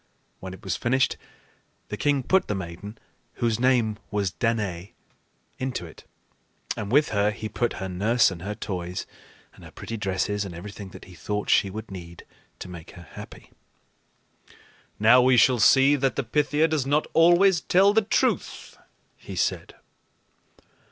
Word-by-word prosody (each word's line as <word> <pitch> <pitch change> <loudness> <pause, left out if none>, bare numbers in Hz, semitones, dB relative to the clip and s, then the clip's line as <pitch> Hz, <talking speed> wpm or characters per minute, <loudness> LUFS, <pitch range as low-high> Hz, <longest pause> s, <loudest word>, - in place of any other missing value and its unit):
When 95 0 -7
it 100 - -19
was 95 - -2
finished, 130 +2 +1 0.7
the - - -3
king 145 -2 +1
put 190 +8 +2
the 105 - -1
maiden, 95 +4 -7 0.4
whose 115 -1 -1
name 120 -4 +2
was 100 -3 -1
Danaë, 100 -5 -2 0.7
into 130 -8 -3
it; 80 - -14 0.7
and 105 -2 -5
with 150 +4 +4
her 100 0 +2
he 110 +1 -5
put 120 +2 -1
her 95 - -5
nurse 105 +5 +2
and 85 -3 -8
her 105 +4 -4
toys 90 -4 -5 0.5
and - - -17
her - - -11
pretty 115 - -7
dresses 100 +1 -1
and 95 -4 -7
everything 100 +2 -9
that - - -12
he 90 - -14
thought 105 +5 -3
she 100 - +4
would 110 +2 -8
need 85 -2 -10 0.3
to - - -8
make 85 -2 -10
her 85 -2 -13
happy. - - -12 1.5
"Now 120 +4 +6
we 130 0 +4
shall 125 +1 +5
see 135 +5 +6
that 135 -1 0
the 140 - -1
Pythia 150 +5 +1
does 155 -5 -1
not 150 +2 +2
always 175 +2 +5
tell 195 +3 +4
the 220 - +4
truth," 210 - -1 0.4
he - - -9
said. - - -2
110 Hz, 160 wpm, -25 LUFS, 95-130 Hz, 1.5 s, Now